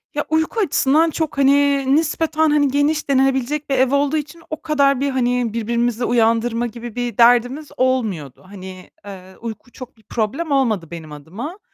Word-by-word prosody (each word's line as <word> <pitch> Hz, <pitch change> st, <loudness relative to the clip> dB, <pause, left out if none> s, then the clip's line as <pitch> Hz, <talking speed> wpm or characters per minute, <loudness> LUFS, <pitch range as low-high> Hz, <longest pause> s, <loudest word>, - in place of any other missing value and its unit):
Ya, 295 Hz, -, -1 dB
uyku 320 Hz, +8 st, 0 dB
açısından 320 Hz, -3 st, +2 dB
çok 315 Hz, -2 st, -3 dB
hani 280 Hz, 0 st, +3 dB
nispeten 315 Hz, 0 st, +1 dB
hani 295 Hz, -1 st, +3 dB
geniş 290 Hz, +2 st, 0 dB
denilebilecek 270 Hz, +2 st, +1 dB
bir 275 Hz, -, +1 dB
ev 260 Hz, 0 st, +2 dB
olduğu 290 Hz, +2 st, +1 dB
için 305 Hz, +3 st, -6 dB
o 310 Hz, -, -6 dB
kadar 280 Hz, -4 st, +2 dB
bir 280 Hz, 0 st, 0 dB
hani 245 Hz, -3 st, 0 dB
birbirimizi 235 Hz, +1 st, -1 dB
uyandırma 230 Hz, 0 st, +1 dB
gibi 235 Hz, 0 st, -9 dB
bir 245 Hz, -3 st, -3 dB
derdimiz 245 Hz, +5 st, +3 dB
olmuyordu. 215 Hz, -, -1 dB
Hani, 185 Hz, -1 st, -11 dB
eee, 190 Hz, -2 st, -11 dB
uyku 230 Hz, +1 st, -8 dB
çok 255 Hz, -2 st, -11 dB
bir 220 Hz, -, -25 dB
problem 255 Hz, +11 st, -3 dB
olmadı 220 Hz, -, 0 dB
benim 160 Hz, -3 st, -9 dB
adıma. 205 Hz, -, -8 dB
255 Hz, 165 wpm, -19 LUFS, 230-290 Hz, -, hani